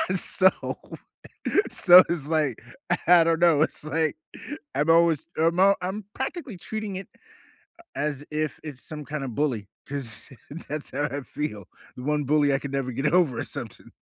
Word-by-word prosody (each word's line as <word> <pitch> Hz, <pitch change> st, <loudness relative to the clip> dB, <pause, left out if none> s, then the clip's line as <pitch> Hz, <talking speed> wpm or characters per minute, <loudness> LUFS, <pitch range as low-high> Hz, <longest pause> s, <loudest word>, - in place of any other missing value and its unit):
So 185 Hz, +1 st, +8 dB, 1.2 s
so 180 Hz, 0 st, +8 dB
it's 160 Hz, -4 st, -2 dB
like, 150 Hz, -8 st, -1 dB, 0.5 s
I 175 Hz, -1 st, +7 dB
don't 165 Hz, 0 st, +1 dB
know, 165 Hz, -4 st, +4 dB
it's 155 Hz, -, -1 dB
like, 155 Hz, +1 st, -1 dB, 0.6 s
I'm 150 Hz, +3 st, 0 dB
always 165 Hz, -2 st, +3 dB
I'm 165 Hz, +2 st, +1 dB
all 195 Hz, +1 st, +5 dB
I'm 190 Hz, +3 st, -4 dB
practically 265 Hz, -, -5 dB
treating 215 Hz, +2 st, -6 dB
it 195 Hz, -, -8 dB, 0.9 s
as 145 Hz, -1 st, -3 dB
if 155 Hz, 0 st, -3 dB
it's 145 Hz, -5 st, -9 dB
some 150 Hz, -1 st, -7 dB
kinda 145 Hz, -2 st, -5 dB
bully 120 Hz, -5 st, -2 dB, 0.2 s
'cause 135 Hz, -6 st, -1 dB, 0.4 s
that's 150 Hz, 0 st, -5 dB
how 145 Hz, -, -2 dB
I 145 Hz, -1 st, -4 dB
feel. 105 Hz, -7 st, -6 dB, 0.3 s
The 125 Hz, -, -8 dB
one 150 Hz, 0 st, 0 dB
bully 145 Hz, 0 st, +2 dB
I 135 Hz, -, +1 dB
could 140 Hz, -1 st, -7 dB
never 135 Hz, -2 st, -2 dB
get 135 Hz, +5 st, -1 dB
over 170 Hz, -9 st, +2 dB
or -, -, -2 dB
something. -, -, -7 dB
150 Hz, 160 wpm, -25 LUFS, 140-170 Hz, 1.2 s, So